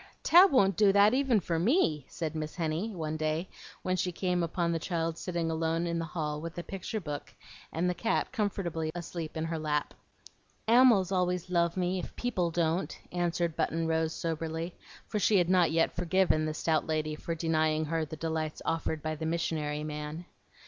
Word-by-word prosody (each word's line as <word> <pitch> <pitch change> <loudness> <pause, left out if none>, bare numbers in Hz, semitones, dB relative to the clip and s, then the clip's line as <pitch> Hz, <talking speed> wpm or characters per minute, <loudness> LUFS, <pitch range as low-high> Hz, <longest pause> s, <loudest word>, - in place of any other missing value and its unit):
Tab 365 +3 +7
won't 195 -8 +4
do 205 -2 +6
that 205 +3 +5
even 260 -4 +3
for 170 -2 -1
me," 170 - +2
said 160 -2 -4
Miss 155 -1 -4
Henny, 165 +5 -1
one 160 -6 -4
day 155 +3 -1 0.4
when 185 - +1
she 185 0 -1
came 180 0 0
upon 170 0 0
the 165 - 0
child 165 -1 -2
sitting 170 -2 -2
alone 165 +1 0
in 170 0 -1
the 165 - -2
hall 150 -2 -3
with 165 +1 -7
a 175 - -3
picture 195 +4 -4
book 150 -6 -6 0.4
and 170 +3 0
the 180 - +1
cat 180 +7 -1
comfortably 190 -8 -2
asleep 170 -2 -5
in 160 - -1
her 165 0 -3
lap. 150 -1 -1 0.7
"Ammals 230 -6 +6
always 180 -1 0
love 170 0 +2
me, 185 +1 0
if - - -7
people 190 -9 0
don't," 165 +1 0
answered 175 -2 0
Button 165 0 0
Rose, 160 0 +1
soberly; 165 +1 -3 0.3
for 210 - -2
she 205 0 +4
had 175 -1 +2
not 180 -3 +5
yet 165 +1 +1
forgiven 180 -2 +2
the 155 0 -2
stout 160 0 0
lady 155 -1 -1
for 165 +2 -4
denying 155 -1 +1
her 160 +1 -1
the 155 +1 -6
delights 160 -1 -2
offered 160 -2 -1
by 155 0 -1
the 160 +1 -4
"missionary 155 -3 -1
man." 150 +2 -5
165 Hz, 190 wpm, -30 LUFS, 160-180 Hz, 0.7 s, Tab